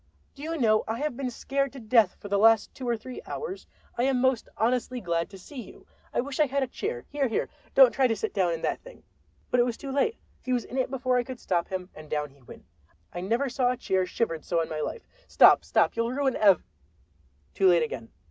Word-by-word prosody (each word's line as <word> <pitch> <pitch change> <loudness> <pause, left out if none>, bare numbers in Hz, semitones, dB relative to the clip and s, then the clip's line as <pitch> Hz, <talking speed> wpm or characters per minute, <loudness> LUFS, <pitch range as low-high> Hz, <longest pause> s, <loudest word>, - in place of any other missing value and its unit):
Do 280 - -13
you 325 +2 -3
know, 215 -5 +3
I 225 +1 -2
have 295 0 -2
been 265 0 -3
scared 275 +3 -2
to 270 - -8
death 220 -4 +3
for - - -8
the 200 0 +1
last 225 0 +4
two 255 -2 -5
or 235 - +1
three 250 +3 -9
hours? 430 -4 -6 0.3
I - - +3
am 265 -2 +2
most 260 -2 +1
honestly 250 +2 0
glad 170 -5 -1
to 195 - -11
see 250 +8 -9
you. - - -14 0.3
I - - +1
wish 275 +2 -6
I 305 - +5
had 275 +1 0
a - - -2
chair—Here, 265 - -3
here, 225 - -1 0.3
don't 265 -3 +8
try 265 -2 +3
to 225 - 0
sit 220 +1 -3
down 185 -4 +2
in 165 -1 -4
that - - -1
thing—" - - -14 0.5
But 250 - +3
it - - +6
was 235 - -3
too 275 - -6
late. 445 +12 +1 0.2
He 255 - -2
was 245 -2 0
in 260 - -4
it 255 - 0
before 255 -1 0
I 245 - +2
could 255 0 -8
stop 170 -2 -1
him 185 0 -5
and 155 -1 -12
down 150 -1 -2
he 140 0 -23
went—I 85 - -13
never 230 +9 0
saw 250 0 +1
a 250 - -1
chair 190 -4 0
shivered 165 -6 -2
so 170 - 0
in 165 - -2
my 155 - -4
life. 300 - -4 0.2
"Stop, - - +6
stop, - - +2
you'll 230 +1 0
ruin 265 -1 0
ev—" 195 -5 +5 0.9
Too 195 - +3
late 175 -3 +5
again. 115 -7 -5
235 Hz, 245 wpm, -27 LUFS, 185-265 Hz, 0.9 s, don't